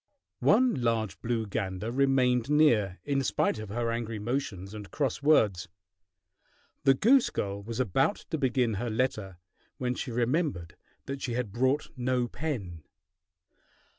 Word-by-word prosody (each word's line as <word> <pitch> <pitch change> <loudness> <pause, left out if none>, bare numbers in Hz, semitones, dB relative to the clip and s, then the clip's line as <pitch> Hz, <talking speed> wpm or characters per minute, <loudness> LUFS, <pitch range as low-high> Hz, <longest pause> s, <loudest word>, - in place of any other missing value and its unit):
One 255 -1 +4
large 115 -5 -1
blue 115 -1 -1
gander 100 +1 -3
remained 130 -2 +2
near, 115 -11 +3
in 140 -1 +1
spite 125 - 0
of 110 -2 -7
her 115 +2 -1
angry 115 -1 -3
motions 105 -4 -3
and 105 -2 -8
cross 140 -3 -2
words. 110 - +3 1.2
The 135 - +6
goose 250 - +4
girl 100 0 -3
was 115 +3 -6
about 130 - +2 0.2
to 160 - -1
begin 125 -4 +1
her 120 - -2
letter 110 -5 -2 0.4
when 125 -1 -1
she 130 - -5
remembered 120 - -1 0.3
that 135 0 -5
she 120 - -3
had 120 -4 -2
brought 130 +6 0
no 125 -1 0
pen. 110 - -4
120 Hz, 140 wpm, -29 LUFS, 105-135 Hz, 1.2 s, The